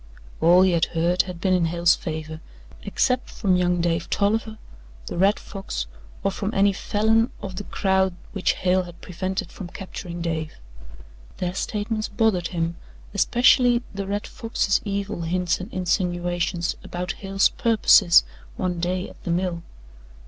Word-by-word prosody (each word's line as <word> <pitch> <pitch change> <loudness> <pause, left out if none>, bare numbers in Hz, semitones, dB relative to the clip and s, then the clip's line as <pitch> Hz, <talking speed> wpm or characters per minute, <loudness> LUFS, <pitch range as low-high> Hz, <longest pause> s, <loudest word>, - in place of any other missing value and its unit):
All 175 +3 +6
he 190 - +4
had 170 -2 +3
heard 175 +2 +3
had 180 -2 -7
been 185 +1 +1
in 180 -2 +3
Hale's 170 +1 +3
favour, 155 -1 -6 0.4
except 250 - 0
from 190 -4 +1
young 180 -1 +2
Dave 165 -1 -1
Tolliver, 220 +2 0 0.5
the - - -5
Red 195 +4 +3
Fox 195 - -5 0.4
or 195 - +1
from 200 +2 -3
any 200 0 +4
Falin 220 +4 +2
of 190 -2 -7
the 205 - -5
crowd, 190 -2 +1 0.2
which 195 -3 +1
Hale 185 0 +1
had 175 -2 -10
prevented 185 0 -4
from 190 - -8
capturing 175 -1 -7
Dave. 160 -2 -3 0.8
Their 180 -1 -2
statements 215 +2 -2
bothered 200 -5 +1
him 170 -1 -2 0.4
especially 245 0 +4
the 200 -1 -4
Red 205 +1 -2
Fox's 225 -4 0
evil 200 -2 -3
hints 175 +1 0
and 185 - -7
insinuations 175 -1 -1
about 180 0 -4
Hale's 195 0 +2
purposes 210 -5 +5 0.3
one 180 -2 -1
day 180 +2 -1
at - - -16
the - - -5
mill. 175 0 -1
185 Hz, 150 wpm, -24 LUFS, 175-200 Hz, 0.8 s, All